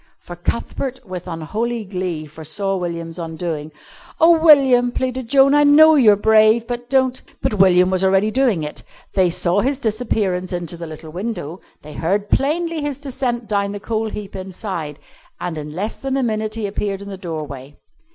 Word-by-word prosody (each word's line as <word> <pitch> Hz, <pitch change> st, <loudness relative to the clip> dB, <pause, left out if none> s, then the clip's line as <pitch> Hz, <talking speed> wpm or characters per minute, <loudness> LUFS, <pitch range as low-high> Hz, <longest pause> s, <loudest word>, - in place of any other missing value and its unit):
For 175 Hz, -, -10 dB
Cuthbert, 245 Hz, +8 st, -3 dB
with 185 Hz, -2 st, -7 dB
unholy 215 Hz, +8 st, -3 dB
glee, 180 Hz, -5 st, -4 dB
foresaw 160 Hz, +6 st, -3 dB
William's 170 Hz, -2 st, -4 dB
undoing. 160 Hz, -2 st, -4 dB, 0.5 s
"Oh, 325 Hz, -1 st, +5 dB
William," 265 Hz, -6 st, +6 dB
pleaded 255 Hz, -1 st, -3 dB
Joan, 275 Hz, +1 st, +5 dB
"I 295 Hz, 0 st, +5 dB
know 310 Hz, +2 st, +7 dB
you're 235 Hz, -9 st, +6 dB
brave, 220 Hz, +2 st, +4 dB
but 245 Hz, 0 st, -5 dB
don't 260 Hz, -1 st, +2 dB
" -, -, -33 dB
But 210 Hz, -, -1 dB
William 180 Hz, -1 st, +5 dB
was 185 Hz, 0 st, 0 dB
already 195 Hz, +3 st, +3 dB
doing 240 Hz, -, +1 dB
it. 150 Hz, -, -6 dB, 0.3 s
They 185 Hz, -2 st, +3 dB
saw 175 Hz, +3 st, +1 dB
his 270 Hz, +4 st, 0 dB
disappearance 210 Hz, -7 st, -1 dB
into 175 Hz, -2 st, -4 dB
the 170 Hz, 0 st, -7 dB
little 155 Hz, 0 st, -10 dB
window, 180 Hz, -3 st, -5 dB, 0.2 s
they 150 Hz, 0 st, -10 dB
heard 200 Hz, +5 st, -1 dB
plainly 325 Hz, +3 st, 0 dB
his 290 Hz, -2 st, -3 dB
descent 255 Hz, -4 st, -3 dB
down 200 Hz, -1 st, -1 dB
the 205 Hz, -, -5 dB
coal 220 Hz, +1 st, -2 dB
heap 205 Hz, -2 st, -7 dB
inside, 185 Hz, -5 st, -5 dB, 0.4 s
and 175 Hz, -2 st, -4 dB
in 150 Hz, 0 st, -7 dB
less 205 Hz, +5 st, -3 dB
than 270 Hz, 0 st, -2 dB
a 270 Hz, -, 0 dB
minute 215 Hz, -2 st, -2 dB
he 225 Hz, -2 st, -3 dB
appeared 200 Hz, 0 st, -3 dB
in 200 Hz, -, -9 dB
the 195 Hz, -, -6 dB
doorway. 150 Hz, -6 st, -7 dB
205 Hz, 180 wpm, -20 LUFS, 175-245 Hz, 0.5 s, know